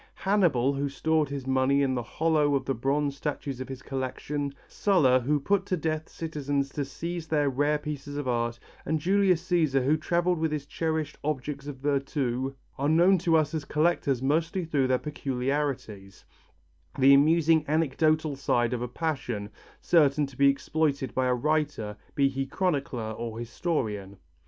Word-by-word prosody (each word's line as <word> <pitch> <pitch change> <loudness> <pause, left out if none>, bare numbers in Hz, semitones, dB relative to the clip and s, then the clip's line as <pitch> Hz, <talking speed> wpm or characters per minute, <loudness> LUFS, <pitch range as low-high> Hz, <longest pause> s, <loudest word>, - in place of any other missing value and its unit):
Hannibal 170 -10 +2
who 140 +1 -1
stored 155 +1 0
his 140 -2 -5
money 130 +1 +2
in 135 -1 +1
the 125 - -1
hollow 150 +2 +1
of 135 - -1
the 135 - 0
bronze 140 +3 0
statues 140 -2 -4
of 130 - -6
his 130 -1 -7
collection, 140 +2 -4
Sulla 150 -11 +3
who 145 +4 +1
put 195 +7 +1
to 185 - 0
death 155 0 -2
citizens 145 -4 -2
to 140 0 -3
seize 170 +4 -5
their 150 -3 +1
rare 145 +3 +1
pieces 145 -1 -6
of 145 -3 -3
art, 120 -1 0 0.3
and 160 - -1
Julius 185 0 +2
Cæsar 155 -7 +2
who 150 +3 +3
travelled 175 +2 0
with 160 -1 0
his 150 -2 -3
cherished 160 0 -3
objects 140 -1 -3
of 145 - -5
virtu, 135 -2 -1 0.2
are 140 +2 +1
known 175 +4 +5
to 165 -2 +3
us 155 0 0
as 155 -2 -2
collectors 150 -5 +1
mostly 165 +6 0
through 145 -5 +1
their 130 0 +3
peculiarities, 130 -8 -3 0.7
the 135 +1 +7
amusing 160 +2 +4
anecdotal 155 0 +1
side 120 -3 +1
of 120 - -2
a 125 - -2
passion, 125 -8 -3 0.3
certain 150 -3 +3
to 135 -2 -12
be 140 +2 +5
exploited 140 -1 -1
by 130 0 +1
a 125 - +2
writer, 145 -6 -1 0.2
be 140 -2 +4
he 135 0 -3
chronicler 135 - -1
or 115 0 -5
historian. 115 - -3
145 Hz, 165 wpm, -27 LUFS, 130-155 Hz, 0.7 s, the